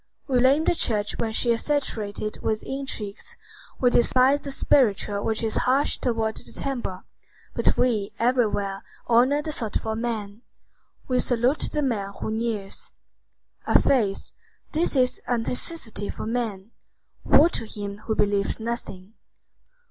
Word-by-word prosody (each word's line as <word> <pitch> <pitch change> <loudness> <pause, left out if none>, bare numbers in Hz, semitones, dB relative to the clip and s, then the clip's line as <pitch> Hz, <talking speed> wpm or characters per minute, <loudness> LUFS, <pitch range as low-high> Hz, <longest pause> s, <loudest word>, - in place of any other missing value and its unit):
We 260 -3 +2
blame 270 +5 +4
the - - +4
church 210 -9 +1
when 225 -1 0
she 235 +2 +1
is 230 - 0
saturated 215 -8 -2
with 215 -1 -1
intrigues, 265 -7 -4 0.4
we 250 -2 +4
despise 260 +4 +4
the 280 - -6
spiritual 210 -7 +2
which 220 0 -1
is 220 - -1
harsh 275 +3 +2
toward 225 -3 -1
the - - -11
temporal; 240 -9 -4 0.5
but - - +1
we 215 -5 +1
everywhere 215 -5 +1 0.2
honor 255 +5 +4
the 310 - -3
thoughtful 220 -3 -2
man. 220 -2 -4 0.7
We 255 -1 +1
salute 245 +4 +1
the 300 - 0
man 205 -7 -1
who - - -3
kneels. 220 -3 -3 0.7
A - - +6
faith; 215 -8 +1 0.4
this 320 -1 0
is 255 -1 +2
a 245 0 +2
necessity 230 - -3
for - - -5
man. 225 -3 -3 0.5
Woe 320 +4 +6
to 225 - -3
him 205 -1 -6
who 220 - +1
believes 200 0 +1
nothing. 220 -4 -5
230 Hz, 140 wpm, -25 LUFS, 210-255 Hz, 0.7 s, A